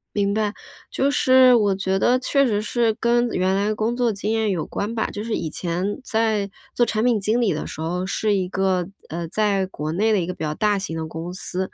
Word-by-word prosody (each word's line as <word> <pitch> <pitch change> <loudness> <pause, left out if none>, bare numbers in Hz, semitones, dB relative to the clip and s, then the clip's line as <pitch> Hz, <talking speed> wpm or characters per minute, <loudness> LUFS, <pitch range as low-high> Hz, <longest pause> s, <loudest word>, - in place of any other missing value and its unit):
明 200 0 +1
白。 210 -1 0 0.4
就 275 +1 +1
是 260 -2 +6
我 205 -4 +3
觉 190 0 -1
得 250 +4 +3
确 275 +2 +2
实 210 -2 0
是 230 0 +1
跟 240 +1 +2
原 185 0 +1
来 200 +1 +1
的 215 - 0
工 225 +3 -1
作 245 -2 +1
经 205 +2 -3
验 220 -1 +1
有 175 -5 -1
关 210 +3 -4
吧， 220 - 0
就 205 +1 -6
是 225 -1 -3
以 160 - -3
前 180 - -3
在 220 -3 0 0.2
做 240 - +3
产 215 0 -1
品 240 -4 +3
经 215 +4 +1
理 210 -8 +2
的 155 - -4
时 - - -8
候 180 +3 -2
是 210 +2 0
一 185 -2 0
个， 190 -2 0 0.2
呃， 170 +1 -4
在 200 0 +1
国 155 -4 -5
内 215 +6 +1
的 205 - +3
一 170 - -1
个 180 - -3
比 160 - -7
较 150 0 -1
大 210 -2 +1
型 165 -4 -4
的 160 - -3
公 165 +3 -6
司， 185 0 -5
205 Hz, 260 characters per minute, -22 LUFS, 185-225 Hz, 0.4 s, 是